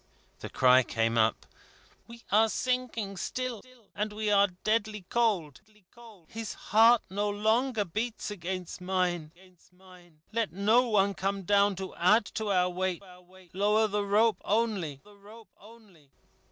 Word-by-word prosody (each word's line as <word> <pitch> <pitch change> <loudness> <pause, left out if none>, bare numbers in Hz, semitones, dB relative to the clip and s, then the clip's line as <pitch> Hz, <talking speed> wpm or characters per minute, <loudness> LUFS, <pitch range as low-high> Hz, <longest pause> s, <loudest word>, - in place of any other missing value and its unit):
The - - -7
cry 130 0 +5
came 115 -1 -1
up: 110 -1 +1 0.6
"We 235 0 -13
are 220 +2 +4
sinking 240 -5 -2
still, 250 +2 -4 0.3
and 210 +1 -3
we 210 0 -2
are 200 0 +5 0.2
deadly 215 -2 -1
cold. 200 - 0 0.7
His 225 -2 -7
heart 225 +2 +4
no 205 +2 -1
longer 220 +2 0
beats 215 +4 -4
against 185 -2 -6
mine. 180 -4 -1 1.0
Let 225 -5 -1
no 220 +6 +3
one 200 -2 +2
come 195 +1 -3
down, 200 +1 +3
to 190 0 -7
add 210 +5 +3
to 220 0 -3
our 180 -1 +2
weight. 185 +1 -3 0.5
Lower 210 +3 +2
the 205 0 -1
rope 210 0 +2
only." 200 -10 -1
205 Hz, 125 wpm, -28 LUFS, 185-220 Hz, 1.0 s, cry